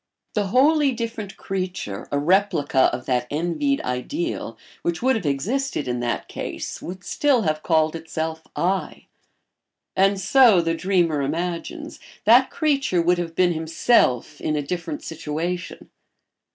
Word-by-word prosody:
The 205 Hz, -2 st, 0 dB
wholly 280 Hz, +5 st, +4 dB
different 230 Hz, -4 st, -5 dB
creature, 185 Hz, -, -4 dB
a 145 Hz, -, +1 dB
replica 160 Hz, -4 st, +3 dB
of 125 Hz, +1 st, -5 dB
that 125 Hz, -1 st, 0 dB
envied 175 Hz, -, 0 dB
ideal, 285 Hz, -, -3 dB, 0.2 s
which 170 Hz, +5 st, -2 dB
would 260 Hz, 0 st, +4 dB
have 200 Hz, -9 st, -2 dB
existed 170 Hz, -, -1 dB
in 125 Hz, -1 st, -1 dB
that 120 Hz, -1 st, -2 dB
case -, -, -6 dB
would 185 Hz, +1 st, -7 dB
still 275 Hz, -6 st, +2 dB
have 155 Hz, -2 st, 0 dB
called 160 Hz, -1 st, +2 dB
itself 160 Hz, 0 st, -4 dB
"I"; 190 Hz, +2 st, -1 dB, 0.9 s
and 195 Hz, +1 st, +3 dB
so, 220 Hz, +1 st, +6 dB
the 165 Hz, -1 st, +1 dB
dreamer 170 Hz, -4 st, +1 dB
imagines, 175 Hz, -, -4 dB, 0.3 s
that 240 Hz, +5 st, +6 dB
creature 285 Hz, -, +1 dB
would 175 Hz, +1 st, +2 dB
have 165 Hz, -1 st, -4 dB
been 180 Hz, -1 st, +3 dB
himself 160 Hz, -, +1 dB
in 155 Hz, -, -1 dB
a 145 Hz, -, -1 dB
different 165 Hz, 0 st, -4 dB
situation. 165 Hz, +3 st, -5 dB
175 Hz, 140 wpm, -23 LUFS, 155-225 Hz, 0.9 s, so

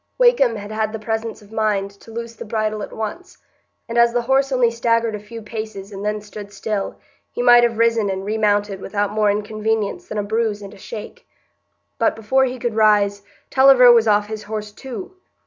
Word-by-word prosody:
Wakem 485 Hz, -, +4 dB
had 205 Hz, 0 st, -7 dB
had 215 Hz, 0 st, -2 dB
the -, -, -3 dB
presence 225 Hz, 0 st, -4 dB
of 205 Hz, -, -19 dB
mind 210 Hz, -3 st, 0 dB
to 200 Hz, +3 st, -18 dB
loose 230 Hz, 0 st, -6 dB
the -, -, -8 dB
bridle 215 Hz, -1 st, -2 dB
at -, -, -6 dB
once, 280 Hz, -, -6 dB, 0.5 s
and 235 Hz, +1 st, 0 dB
as 235 Hz, 0 st, +5 dB
the 240 Hz, 0 st, 0 dB
horse 270 Hz, +2 st, +2 dB
only 250 Hz, -3 st, +3 dB
staggered 230 Hz, -1 st, +1 dB
a 210 Hz, -, -4 dB
few 220 Hz, +2 st, -10 dB
paces 215 Hz, -2 st, -7 dB
and 195 Hz, 0 st, -7 dB
then 210 Hz, 0 st, -2 dB
stood 205 Hz, -1 st, -10 dB
still, 205 Hz, -1 st, -3 dB, 0.4 s
he 245 Hz, -, -3 dB
might 240 Hz, -1 st, +7 dB
have 235 Hz, -2 st, +1 dB
risen 230 Hz, -2 st, +2 dB
and 190 Hz, 0 st, -3 dB
remounted 205 Hz, -2 st, 0 dB
without 205 Hz, +1 st, -2 dB
more 210 Hz, -1 st, +2 dB
inconvenience 215 Hz, -, -2 dB
than 215 Hz, -, -5 dB
a 205 Hz, -, 0 dB
bruise 215 Hz, 0 st, -1 dB
and 200 Hz, +1 st, -9 dB
a -, -, -14 dB
shake. 215 Hz, +2 st, -9 dB, 0.7 s
But -, -, +2 dB
before 260 Hz, +5 st, +2 dB
he 255 Hz, 0 st, -4 dB
could 240 Hz, -2 st, -2 dB
rise, 205 Hz, -2 st, +3 dB, 0.3 s
Tulliver 265 Hz, -2 st, +7 dB
was 230 Hz, -1 st, +5 dB
off 205 Hz, -1 st, +3 dB
his 215 Hz, 0 st, -6 dB
horse 210 Hz, 0 st, -5 dB
too. 235 Hz, -, -8 dB
220 Hz, 200 wpm, -20 LUFS, 205-235 Hz, 0.7 s, might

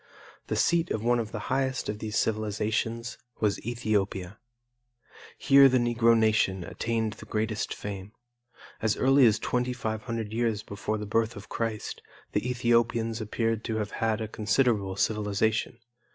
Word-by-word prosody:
The -, -, -1 dB
seat 170 Hz, -1 st, +2 dB
of 110 Hz, -, -2 dB
one 120 Hz, +1 st, +3 dB
of 110 Hz, -1 st, -4 dB
the -, -, -4 dB, 0.2 s
highest 130 Hz, 0 st, 0 dB
of 105 Hz, 0 st, -3 dB
these 110 Hz, 0 st, -3 dB
civilizations 110 Hz, +2 st, -1 dB, 0.2 s
was 105 Hz, -2 st, 0 dB
Ethiopia. 105 Hz, -5 st, -2 dB, 1.0 s
Here 140 Hz, -1 st, +7 dB
the 130 Hz, -, +3 dB
Negro 120 Hz, -1 st, +3 dB
nation 110 Hz, -4 st, +2 dB
attained 110 Hz, +2 st, -2 dB
the -, -, -13 dB
greatest 110 Hz, 0 st, -2 dB
fame. 100 Hz, -1 st, -6 dB, 0.7 s
As 110 Hz, -2 st, +1 dB
early 135 Hz, -1 st, +5 dB
as 110 Hz, -1 st, +3 dB
2,500 115 Hz, -2 st, -2 dB
years 115 Hz, -3 st, 0 dB
before 105 Hz, +2 st, -3 dB
the 105 Hz, -, -5 dB
birth 110 Hz, +2 st, 0 dB
of 100 Hz, -, -10 dB
Christ 115 Hz, -2 st, -3 dB, 0.3 s
the 105 Hz, +4 st, -1 dB
Ethiopians 115 Hz, -2 st, +1 dB
appeared 115 Hz, +1 st, -1 dB
to 110 Hz, -, -2 dB
have 105 Hz, -2 st, -2 dB
had 110 Hz, 0 st, -1 dB
a 110 Hz, -, -2 dB
considerable 105 Hz, -3 st, +1 dB
civilization. 105 Hz, +2 st, 0 dB
110 Hz, 145 wpm, -28 LUFS, 105-120 Hz, 1.0 s, Here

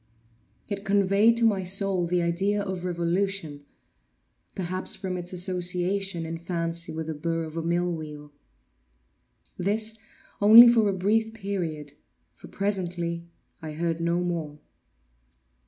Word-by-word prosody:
It 200 Hz, -1 st, -5 dB
conveyed 200 Hz, +3 st, +3 dB
to 230 Hz, -, +3 dB
my 205 Hz, -4 st, +2 dB
soul 190 Hz, -1 st, +1 dB
the 175 Hz, 0 st, +1 dB
idea 195 Hz, +5 st, 0 dB
of 190 Hz, -2 st, -5 dB
revolution—perhaps 175 Hz, -, -4 dB
from 185 Hz, -2 st, -4 dB
its 180 Hz, 0 st, -5 dB
association 180 Hz, 0 st, -1 dB
in 165 Hz, 0 st, -5 dB
fancy 170 Hz, -1 st, -3 dB
with 160 Hz, 0 st, -4 dB
the 160 Hz, -, -4 dB
burr 165 Hz, +2 st, -2 dB
of 160 Hz, 0 st, -8 dB
a 165 Hz, -, -2 dB
mill 175 Hz, +2 st, 0 dB
wheel. 150 Hz, -2 st, -8 dB, 1.3 s
This 215 Hz, +4 st, -1 dB, 0.4 s
only 225 Hz, +4 st, +10 dB
for 230 Hz, -3 st, +4 dB
a -, -, 0 dB
brief 220 Hz, +4 st, 0 dB
period, 170 Hz, -8 st, -4 dB, 0.4 s
for -, -, -14 dB
presently 175 Hz, -4 st, -3 dB, 0.3 s
I 155 Hz, -1 st, -6 dB
heard 165 Hz, +1 st, -2 dB
no 170 Hz, +1 st, 0 dB
more. 165 Hz, -4 st, -3 dB
180 Hz, 125 wpm, -26 LUFS, 165-200 Hz, 1.3 s, only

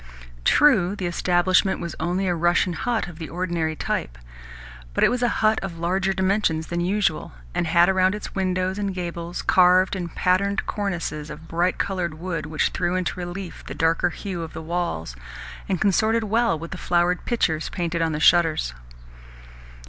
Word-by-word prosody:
True, 205 Hz, -, +4 dB
the 190 Hz, -, -4 dB
establishment 180 Hz, +2 st, +2 dB
was 170 Hz, -2 st, -5 dB
only 180 Hz, +4 st, -1 dB
a 180 Hz, -, +1 dB
Russian 175 Hz, +1 st, +2 dB
hut 225 Hz, +5 st, -1 dB
of 175 Hz, -2 st, -11 dB
the 160 Hz, -, -6 dB
ordinary 170 Hz, -3 st, -2 dB
type, -, -, -3 dB, 0.8 s
but -, -, +2 dB
it -, -, +6 dB
was 250 Hz, 0 st, -1 dB
a 245 Hz, -, +3 dB, 0.2 s
hut 215 Hz, 0 st, +4 dB
of 175 Hz, -3 st, -6 dB
larger 185 Hz, +3 st, 0 dB
dimensions 190 Hz, -4 st, +1 dB
than 170 Hz, +1 st, -3 dB
usual, 190 Hz, -, 0 dB, 0.2 s
and 170 Hz, -, -1 dB
had 170 Hz, +2 st, +5 dB
around 190 Hz, 0 st, +3 dB
its 210 Hz, -, -7 dB
windows 185 Hz, 0 st, -1 dB
and 200 Hz, -2 st, -2 dB
gables 170 Hz, -1 st, -5 dB
carved 185 Hz, +1 st, +4 dB
and 175 Hz, -3 st, -5 dB
patterned 200 Hz, +2 st, +1 dB
cornices 170 Hz, -7 st, -3 dB
of 155 Hz, +2 st, -10 dB
bright 175 Hz, +3 st, 0 dB
coloured 180 Hz, -5 st, -2 dB
wood 165 Hz, -2 st, -4 dB
which 155 Hz, 0 st, 0 dB
threw 175 Hz, -, -1 dB
into 185 Hz, 0 st, -2 dB
relief 175 Hz, 0 st, -6 dB
the -, -, -6 dB
darker 165 Hz, +2 st, +2 dB
hue 180 Hz, 0 st, -5 dB
of 165 Hz, -1 st, -7 dB
the 160 Hz, -, -7 dB
walls, 160 Hz, -, -3 dB, 0.5 s
and 185 Hz, -3 st, 0 dB
consorted 220 Hz, +3 st, +2 dB
well 225 Hz, -3 st, +1 dB
with 165 Hz, +2 st, -8 dB
the 190 Hz, -, -5 dB
flowered 175 Hz, +1 st, +1 dB
pitchers 160 Hz, -10 st, 0 dB
painted 170 Hz, -2 st, -2 dB
on 165 Hz, -1 st, +1 dB
the 150 Hz, -, -2 dB
shutters. 160 Hz, -, +3 dB
175 Hz, 175 wpm, -23 LUFS, 165-190 Hz, 0.8 s, it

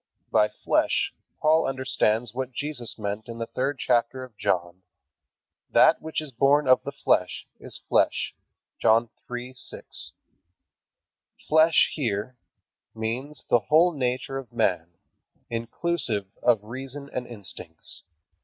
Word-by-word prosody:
By 105 Hz, 0 st, +4 dB
"flesh" -, -, +1 dB, 0.3 s
Paul 155 Hz, +1 st, +4 dB
understands 125 Hz, -4 st, 0 dB
what 130 Hz, 0 st, -4 dB
Jesus 140 Hz, -4 st, -3 dB
meant 105 Hz, 0 st, -4 dB
in 115 Hz, -1 st, -7 dB
the 115 Hz, -, -2 dB
third 135 Hz, +4 st, -2 dB
chapter 125 Hz, +1 st, +1 dB
of 125 Hz, -4 st, -12 dB
John, 90 Hz, -3 st, -1 dB, 0.9 s
"That -, -, +5 dB
which 160 Hz, 0 st, -3 dB
is 155 Hz, -3 st, -7 dB
born 140 Hz, +4 st, +3 dB
of 130 Hz, -, +6 dB
the 140 Hz, -, -5 dB
flesh 90 Hz, -9 st, +1 dB
is -, -, -8 dB
flesh". -, -, +2 dB, 0.5 s
(John 115 Hz, +1 st, +4 dB, 0.2 s
3:6.) 125 Hz, +1 st, -4 dB, 1.3 s
"Flesh" 160 Hz, +1 st, +5 dB
here 120 Hz, -3 st, -2 dB, 0.6 s
means 125 Hz, +6 st, -4 dB
the 120 Hz, -, +5 dB
whole 165 Hz, +4 st, +6 dB
nature 130 Hz, 0 st, -2 dB
of 130 Hz, -3 st, -11 dB
man, 90 Hz, -8 st, +1 dB, 0.6 s
inclusive 115 Hz, -, -1 dB, 0.2 s
of 115 Hz, -4 st, +3 dB
reason 135 Hz, +5 st, -7 dB
and 125 Hz, -1 st, -3 dB
instincts. 90 Hz, -7 st, -5 dB
125 Hz, 120 wpm, -26 LUFS, 110-135 Hz, 1.3 s, of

